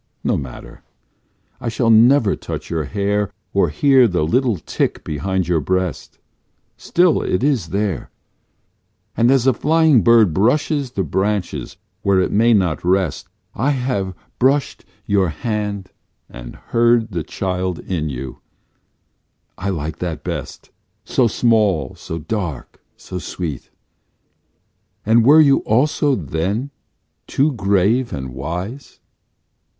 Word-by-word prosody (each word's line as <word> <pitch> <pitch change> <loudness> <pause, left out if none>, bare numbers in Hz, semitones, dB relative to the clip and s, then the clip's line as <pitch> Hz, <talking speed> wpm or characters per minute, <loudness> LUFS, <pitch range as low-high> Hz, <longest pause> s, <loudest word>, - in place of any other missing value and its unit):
No - - +1
matter; 65 -3 -8 0.8
I 120 - -3
shall 115 0 +1
never 115 0 +5
touch - - -7
your 80 -3 -1
hair 100 +2 -1 0.2
Or 95 -4 +2
hear 130 - +4
the 90 -6 0
little 120 - +1
tick - - -2
behind 90 +4 -2
your 85 -2 +2
breast, 95 +3 -2 0.6
Still 175 -1 +2
it 90 - -1
is 135 - +1
there, 100 -1 -2 1.1
And 115 +1 +3
as 135 -2 +3
a 130 - +4
flying 155 -1 +3
bird 110 -4 +5
Brushes 130 - +1
the 95 - -1
branches 95 -5 -2 0.2
where 100 -1 +2
it 95 - 0
may 115 +3 +3
not 95 -8 +1
rest 90 -3 0 0.3
I 130 +7 0
have 125 -9 -2 0.2
brushed 135 +3 +1 0.2
your 100 -3 +2
hand 105 - -4 0.4
and - - -10
heard 115 -1 +1
The 85 -3 -2
child 90 +1 -3
in 80 -5 -3
you: 65 -1 -7 1.2
I 100 - -4
like 80 -3 -4
that 85 -3 -4
best - - -6 0.3
So 125 - +2
small, 105 - +1
so 80 - -7
dark, 85 - -5 0.2
so 90 - -7
sweet; 80 -5 -6 1.4
and 115 +2 +4
were 150 +6 +7
you 140 -2 +5
also 140 +4 +1
then 95 - -3 0.6
too 145 +3 +1
grave 100 +3 +1
and 65 -2 -5
wise? 90 - -6
100 Hz, 125 wpm, -19 LUFS, 85-120 Hz, 1.4 s, were